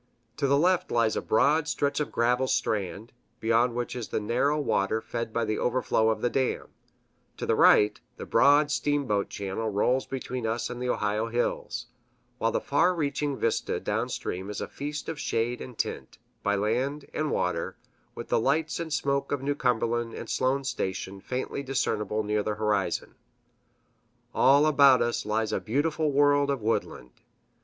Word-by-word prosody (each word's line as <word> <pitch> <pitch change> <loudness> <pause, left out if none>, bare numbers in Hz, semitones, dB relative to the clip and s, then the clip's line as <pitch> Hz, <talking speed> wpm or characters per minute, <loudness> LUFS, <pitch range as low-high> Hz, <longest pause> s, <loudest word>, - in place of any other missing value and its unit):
To 140 - +1
the 140 +1 +4
left 180 +3 +2
lies 115 -2 +2
a - - -1
broad 145 +7 +2
stretch 145 -2 0
of 150 - -2
gravel 125 +3 +1
strand, 105 -1 -2 0.3
beyond 115 +1 +2
which 120 0 -3
is 120 -4 -4
the - - -2
narrow 125 +8 +1
water 110 -6 +1
fed 115 0 -5
by 115 0 0
the 110 0 -1
overflow 120 -3 +1
of 110 - -1
the 120 - +3
dam; 130 -2 -1 0.7
to - - -4
the - - +2
right, 105 0 +5 0.2
the - - -6
broad 145 +1 +4
steamboat 140 -10 0
channel 100 +3 -3
rolls 125 +6 +1
between 130 -3 -4
us 115 +2 -2
and 125 0 -6
the 125 - -2
Ohio 105 0 0
hills, 120 0 -2 0.5
while 115 - +1
the - - 0
far 175 +6 +2
reaching 145 -3 -1
vista 115 - -1
downstream 95 +3 -3
is 105 - -5
a - - -4
feast 145 +1 -6
of 160 -2 -4
shade 120 -1 -1
and 125 -3 -9
tint, - - -4 0.2
by 100 0 +1
land 125 +8 -1
and 155 -1 -1
water, 90 -8 -1 0.4
with - - -7
the - - +3
lights 150 +8 0
and 165 -1 -4
smoke 140 -2 0
of 140 -2 -1
New 145 +1 +1
Cumberland 120 -3 0
and - - -7
Sloan's 135 +1 0
Station 95 -1 -4
faintly 130 +4 -3
discernible 110 -6 -1
near 105 0 0
the 105 0 -2
horizon. 105 0 -1 1.2
All 140 +3 +5
about 140 -4 +6
us 120 -2 -2
lies 110 0 0
a - - +1
beautiful 150 +5 0
world 145 0 +3
of 140 -2 0
woodland. 110 - -2
125 Hz, 170 wpm, -27 LUFS, 110-140 Hz, 1.2 s, about